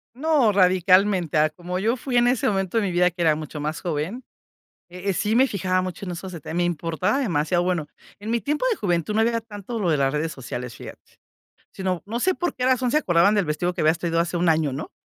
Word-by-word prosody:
No, 285 Hz, -5 st, +3 dB
radicalmente, 185 Hz, -3 st, +3 dB
a 155 Hz, +1 st, +4 dB
como 180 Hz, +3 st, -5 dB
yo 230 Hz, +6 st, +1 dB
fui 250 Hz, 0 st, -2 dB
en 240 Hz, 0 st, +4 dB
ese 245 Hz, -1 st, +1 dB
momento 195 Hz, +1 st, 0 dB
de 225 Hz, -, +2 dB
mi 190 Hz, -, -1 dB
vida 180 Hz, +1 st, +3 dB
que 175 Hz, +1 st, -21 dB
era 155 Hz, -2 st, +4 dB
mucho 155 Hz, -1 st, -7 dB
más 150 Hz, +2 st, -3 dB
joven, 175 Hz, -, -3 dB, 0.7 s
eh 180 Hz, +3 st, -5 dB
eh, -, -, +2 dB
sí 210 Hz, +5 st, 0 dB
me 265 Hz, +2 st, +5 dB
fijaba 185 Hz, -3 st, 0 dB
mucho 185 Hz, +2 st, -5 dB
en 180 Hz, -, -4 dB
esos 185 Hz, +2 st, -7 dB
detalles, 165 Hz, -1 st, -7 dB
me 175 Hz, -, +1 dB
importaba 175 Hz, -, -1 dB
demasiado. 175 Hz, -, +1 dB
Bueno, 175 Hz, -4 st, -1 dB, 0.3 s
en 215 Hz, +2 st, -5 dB
mi 235 Hz, -, +1 dB
tiempo 295 Hz, -, -1 dB
de -, -, -1 dB
juventud 175 Hz, 0 st, -1 dB
no 220 Hz, -, +1 dB
había 230 Hz, 0 st, +1 dB
tanto 220 Hz, +1 st, -7 dB
lo 185 Hz, -5 st, 0 dB
de 155 Hz, -, +2 dB
las 135 Hz, 0 st, +1 dB
redes 155 Hz, +2 st, -1 dB
sociales, 125 Hz, -2 st, -6 dB
fíjate, -, -, -13 dB, 0.6 s
sino, 185 Hz, -2 st, -3 dB
no 235 Hz, +3 st, -3 dB
sé 375 Hz, 0 st, +2 dB
por 350 Hz, -4 st, -2 dB
qué 250 Hz, -, -3 dB
razón 255 Hz, -1 st, +2 dB
se 305 Hz, -, +4 dB
acordaban 175 Hz, -, +3 dB
del 200 Hz, -3 st, +2 dB
vestido 175 Hz, +4 st, -1 dB
que 175 Hz, -, -4 dB
habías 160 Hz, +2 st, +3 dB
traído 170 Hz, -1 st, 0 dB
hace 175 Hz, +1 st, -1 dB
un 170 Hz, 0 st, +1 dB
año, 155 Hz, -4 st, +2 dB
¿no? 140 Hz, +4 st, -6 dB
180 Hz, 245 wpm, -23 LUFS, 165-220 Hz, 0.7 s, me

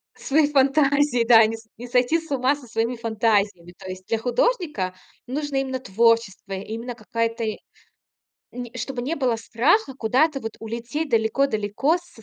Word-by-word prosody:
Свои 295 Hz, +2 st, +2 dB
фантазии, 275 Hz, -2 st, +3 dB
да. 225 Hz, -2 st, +8 dB
Не 225 Hz, +1 st, -2 dB
с 225 Hz, 0 st, -17 dB
не 245 Hz, +2 st, -8 dB
сойти 250 Hz, +6 st, +2 dB
с 325 Hz, -2 st, -14 dB
ума 265 Hz, +1 st, +2 dB
со 280 Hz, -4 st, -14 dB
своими 230 Hz, +2 st, -1 dB
фантазиями. 210 Hz, -6 st, 0 dB
То -, -, -11 dB
есть 185 Hz, 0 st, -8 dB
для 225 Hz, -, +1 dB
художника 245 Hz, -, 0 dB, 0.3 s
нужно 285 Hz, +2 st, -3 dB
именно 265 Hz, -1 st, -1 dB
творчество, 225 Hz, -2 st, +1 dB
именно 225 Hz, +5 st, -5 dB
какая-то 230 Hz, -1 st, -2 dB
и 215 Hz, -1 st, -2 dB, 1.0 s
Не 245 Hz, 0 st, -7 dB
чтобы 250 Hz, +1 st, -4 dB
не 285 Hz, +7 st, -1 dB
было 255 Hz, -4 st, +1 dB
страха 270 Hz, -, +1 dB
куда-то 270 Hz, +5 st, +1 dB
вот 225 Hz, -2 st, -5 dB
улететь 235 Hz, +7 st, -4 dB
далеко-далеко 225 Hz, -, +1 dB
со 350 Hz, -10 st, -18 dB
240 Hz, 155 wpm, -23 LUFS, 225-275 Hz, 1.0 s, да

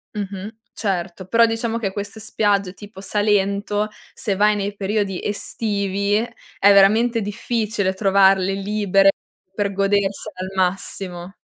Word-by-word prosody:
Mh-mh, 200 Hz, 0 st, -5 dB, 0.2 s
certo. 185 Hz, -2 st, -3 dB
Però 230 Hz, +3 st, +5 dB
diciamo 225 Hz, 0 st, -1 dB
che 205 Hz, -4 st, -2 dB
queste 205 Hz, +2 st, -6 dB
spiagge 200 Hz, -3 st, 0 dB
tipo 205 Hz, -1 st, -12 dB
Salento, 205 Hz, +1 st, 0 dB, 0.2 s
se 200 Hz, -3 st, -2 dB
vai 210 Hz, +1 st, +3 dB
nei 205 Hz, 0 st, -3 dB
periodi 200 Hz, -1 st, -2 dB
estivi 200 Hz, -1 st, -1 dB
è 225 Hz, -3 st, +1 dB
veramente 225 Hz, +4 st, +4 dB
difficile 210 Hz, -1 st, -1 dB
trovarle 195 Hz, -1 st, +3 dB
libere 195 Hz, -1 st, +3 dB, 0.4 s
per 200 Hz, 0 st, -1 dB
godersele 200 Hz, +1 st, 0 dB
al 185 Hz, -, -3 dB
massimo. 185 Hz, 0 st, -2 dB
200 Hz, 120 wpm, -21 LUFS, 195-210 Hz, 0.4 s, Però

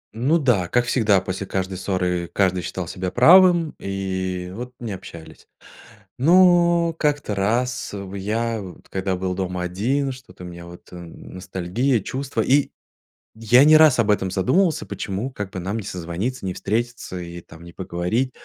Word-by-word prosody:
Ну 135 Hz, +9 st, +2 dB
да, 120 Hz, -, +1 dB
как 120 Hz, +4 st, +1 dB
всегда, 110 Hz, -6 st, +3 dB
после 95 Hz, +1 st, -5 dB
каждой 95 Hz, -1 st, -3 dB
ссоры 90 Hz, -3 st, -1 dB
каждый 95 Hz, -2 st, +1 dB
считал 90 Hz, -1 st, -5 dB
себя 90 Hz, +1 st, -4 dB
правым, 170 Hz, -, +6 dB
и 95 Hz, -2 st, -4 dB
вот 125 Hz, +3 st, -8 dB
не 115 Hz, -3 st, -5 dB
общались. 85 Hz, -4 st, -11 dB, 0.7 s
Но 170 Hz, +1 st, +4 dB
как-то 145 Hz, -9 st, -1 dB
раз 120 Hz, +5 st, -1 dB
в 100 Hz, -1 st, -7 dB
я, 110 Hz, +3 st, -2 dB
вот 95 Hz, -3 st, -11 dB
когда 95 Hz, 0 st, -2 dB
был 90 Hz, 0 st, -2 dB
дома 90 Hz, -1 st, -3 dB
один, 125 Hz, +11 st, -1 dB
что-то 125 Hz, -9 st, -11 dB
у -, -, -7 dB
меня 85 Hz, 0 st, -10 dB
вот 85 Hz, 0 st, -13 dB
ностальгия, 90 Hz, +7 st, -3 dB
чувства, 130 Hz, +2 st, -4 dB
и 140 Hz, +5 st, +2 dB, 0.6 s
я 120 Hz, +4 st, +5 dB
не 155 Hz, +1 st, +7 dB
раз 155 Hz, -5 st, +6 dB
об 110 Hz, -2 st, +2 dB
этом 95 Hz, -2 st, +1 dB
задумывался, 160 Hz, -, +1 dB
почему 100 Hz, +7 st, -4 dB
как 105 Hz, -6 st, -6 dB
бы 95 Hz, -, -7 dB
нам 95 Hz, +5 st, -3 dB
не 110 Hz, -, -4 dB
созвониться, 90 Hz, +7 st, -4 dB
не 90 Hz, -, -3 dB
встретиться 115 Hz, -3 st, -3 dB
и, 85 Hz, 0 st, -8 dB
там, 80 Hz, -, -15 dB
не 85 Hz, 0 st, -13 dB
поговорить. 95 Hz, +8 st, -2 dB
100 Hz, 165 wpm, -22 LUFS, 90-125 Hz, 0.7 s, не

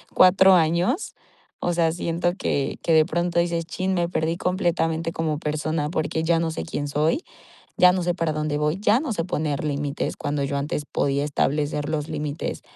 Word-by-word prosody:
4 190 Hz, +1 st, +7 dB
años?". 175 Hz, -, +1 dB, 0.5 s
O 175 Hz, -, +1 dB
sea, 165 Hz, -1 st, +2 dB
siento 170 Hz, +1 st, -1 dB
que 140 Hz, -7 st, -1 dB
que 165 Hz, -, 0 dB
de 155 Hz, -1 st, +6 dB
pronto 175 Hz, 0 st, 0 dB
dices: 170 Hz, -1 st, 0 dB
"Chin, 185 Hz, +3 st, -2 dB
me 175 Hz, -1 st, 0 dB
perdí 165 Hz, -1 st, -1 dB
completamente 165 Hz, -3 st, 0 dB
como 155 Hz, -2 st, -1 dB
persona, 155 Hz, 0 st, -2 dB
porque 160 Hz, -1 st, -1 dB
ya 165 Hz, 0 st, +2 dB
no 165 Hz, -1 st, -1 dB
sé -, -, -4 dB
quién 145 Hz, -3 st, -4 dB
soy, 155 Hz, -, +1 dB, 0.5 s
ya 180 Hz, -, +7 dB
no 185 Hz, -, -1 dB
sé 175 Hz, -, +1 dB
para 165 Hz, -2 st, -1 dB
dónde 150 Hz, -1 st, -2 dB
voy, 150 Hz, +4 st, 0 dB
ya 215 Hz, +3 st, +3 dB
no 285 Hz, -6 st, -3 dB
sé 165 Hz, -5 st, -2 dB
poner 150 Hz, -5 st, -2 dB
límites", 145 Hz, -1 st, -2 dB
cuando 145 Hz, -1 st, -2 dB
yo 140 Hz, +1 st, -2 dB
antes 145 Hz, +1 st, -3 dB
podía 140 Hz, +1 st, 0 dB
establecer 145 Hz, 0 st, -1 dB
los 155 Hz, -1 st, -2 dB
límites 150 Hz, -1 st, -4 dB
160 Hz, 190 wpm, -24 LUFS, 150-175 Hz, 0.5 s, 4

